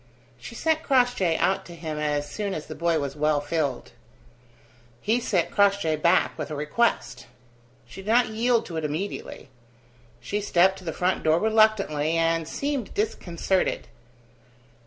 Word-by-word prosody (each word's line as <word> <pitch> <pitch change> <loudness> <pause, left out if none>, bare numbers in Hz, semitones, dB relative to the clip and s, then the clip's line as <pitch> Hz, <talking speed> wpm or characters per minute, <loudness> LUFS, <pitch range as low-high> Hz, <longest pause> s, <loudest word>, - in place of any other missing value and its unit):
She - - -10
sent 320 -1 0
Crossjay 245 - +2
out 195 0 +1
to 170 - -10
him 155 -2 -5
as 145 -1 -1
soon 200 +6 -4
as 155 - -5
the 155 - -7
boy 170 0 0
was 140 -2 -3
well 150 0 +1
filled. 145 -3 -2 1.1
He 225 +4 +1
sent 190 -7 0
Crossjay 200 -6 +2
back 170 +4 +2
with 155 - -4
a 155 - -4
request. 150 +11 -1 0.6
She 155 +11 -11
did 200 - -7
not 240 0 +4
yield 230 +1 +1
to 165 - -6
it 160 - -3
immediately. 155 -1 -5 0.7
She 205 +1 -3
stepped 190 -1 +3
to - - -14
the 165 - -2
front 180 +3 0
door 160 0 +3
reluctantly, 210 -8 +2
and 165 -1 +1
seemed 280 - -3
disconcerted. 190 - -1
175 Hz, 155 wpm, -25 LUFS, 155-215 Hz, 1.1 s, not